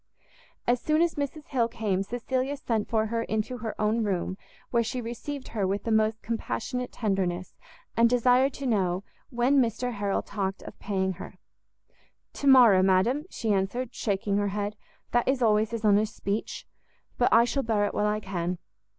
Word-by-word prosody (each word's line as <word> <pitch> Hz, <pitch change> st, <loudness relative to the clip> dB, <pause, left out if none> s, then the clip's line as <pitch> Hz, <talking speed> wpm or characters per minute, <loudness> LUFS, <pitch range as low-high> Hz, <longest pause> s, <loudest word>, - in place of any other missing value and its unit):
As 240 Hz, 0 st, +2 dB
soon 310 Hz, +2 st, +3 dB
as 345 Hz, -, +1 dB
Mrs 290 Hz, +1 st, -4 dB
Hill 240 Hz, -4 st, +2 dB
came, 215 Hz, -5 st, -1 dB
Cecilia 255 Hz, +6 st, -2 dB
sent 225 Hz, -6 st, -2 dB
for 220 Hz, -1 st, +2 dB
her 230 Hz, +1 st, -1 dB
into 225 Hz, +3 st, -2 dB
her 225 Hz, -3 st, -5 dB
own 215 Hz, +2 st, +1 dB
room, 185 Hz, -2 st, -1 dB, 0.4 s
where 235 Hz, -, +3 dB
she 245 Hz, +3 st, -3 dB
received 250 Hz, +4 st, -6 dB
her 205 Hz, -4 st, -1 dB
with 200 Hz, +2 st, -1 dB
the 230 Hz, -, -2 dB
most 220 Hz, 0 st, +2 dB
compassionate 245 Hz, +2 st, -3 dB
tenderness, 185 Hz, -4 st, -1 dB, 0.4 s
and 230 Hz, 0 st, +5 dB
desired 250 Hz, +2 st, +4 dB
to 280 Hz, -, -6 dB
know 190 Hz, -6 st, +1 dB, 0.3 s
when 260 Hz, +2 st, +3 dB
Mr 245 Hz, +1 st, -1 dB
Harrel 205 Hz, -2 st, -1 dB
talked 195 Hz, -1 st, -3 dB
of -, -, -11 dB
paying 190 Hz, -2 st, -1 dB
her? -, -, -9 dB, 1.0 s
"To 280 Hz, -, -3 dB
morrow, 240 Hz, -8 st, +8 dB
madam," 195 Hz, -, +2 dB
she 220 Hz, -, -1 dB
answered, 225 Hz, +6 st, -1 dB
shaking 200 Hz, -1 st, -1 dB
her 205 Hz, 0 st, +1 dB
head, 205 Hz, +1 st, -3 dB, 0.4 s
"that 240 Hz, 0 st, +2 dB
is 265 Hz, -1 st, +2 dB
always 215 Hz, -1 st, +3 dB
his 230 Hz, -1 st, -4 dB
honour's 210 Hz, +1 st, +4 dB
speech: 200 Hz, +2 st, -4 dB, 0.5 s
but 245 Hz, -, +3 dB
I 230 Hz, -, +7 dB
shall 275 Hz, +3 st, 0 dB
bear 220 Hz, -4 st, +1 dB
it -, -, -3 dB
while 210 Hz, -, +1 dB
I 210 Hz, 0 st, 0 dB
can. 180 Hz, -2 st, -3 dB
225 Hz, 175 wpm, -27 LUFS, 200-245 Hz, 1.0 s, morrow